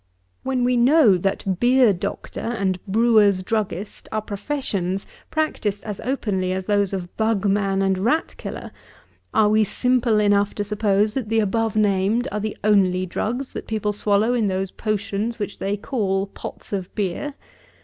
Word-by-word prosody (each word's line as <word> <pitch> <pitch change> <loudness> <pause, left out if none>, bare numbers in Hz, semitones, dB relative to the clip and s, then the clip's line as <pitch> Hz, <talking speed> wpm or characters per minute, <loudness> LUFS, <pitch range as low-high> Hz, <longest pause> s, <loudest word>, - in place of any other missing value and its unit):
When 260 -2 -1
we 250 0 +2
know, 250 - +6
that 190 0 -1
beer 245 -3 +5
doctor 195 +3 -5
and 195 -6 -2
brewers' 210 -2 +4
druggist 205 -2 -3
are 220 - 0
professions, 200 -4 -3 0.2
practised 220 -10 -1
as 210 -3 -5
openly 205 -8 -1
as 190 0 -3
those 205 -1 +1
of 185 -3 -5
bug 220 -2 +1
man 195 -1 +1
and 190 -1 +1
rat 235 +11 +1
killer, - - -7 0.6
are 220 -1 +4
we 215 +1 +4
simple 245 0 +1
enough 205 -1 +2
to 205 - -1
suppose 210 0 +1
that 245 -5 -3
the 225 0 +2
above 220 +1 0
named 210 +3 +2
are 210 - -2
the 215 0 -4
only 190 -3 +3
drugs 245 +8 -3
that - - -6
people 215 -2 -1
swallow 210 +3 +2
in 230 -4 +1
those 190 0 -2
potions, 215 +1 -2
which 205 -2 -5
they 200 +1 -1
call 195 -4 -1
pots 200 - -9
of 190 -3 -4
beer? 210 +8 -2
210 Hz, 160 wpm, -22 LUFS, 195-225 Hz, 0.6 s, know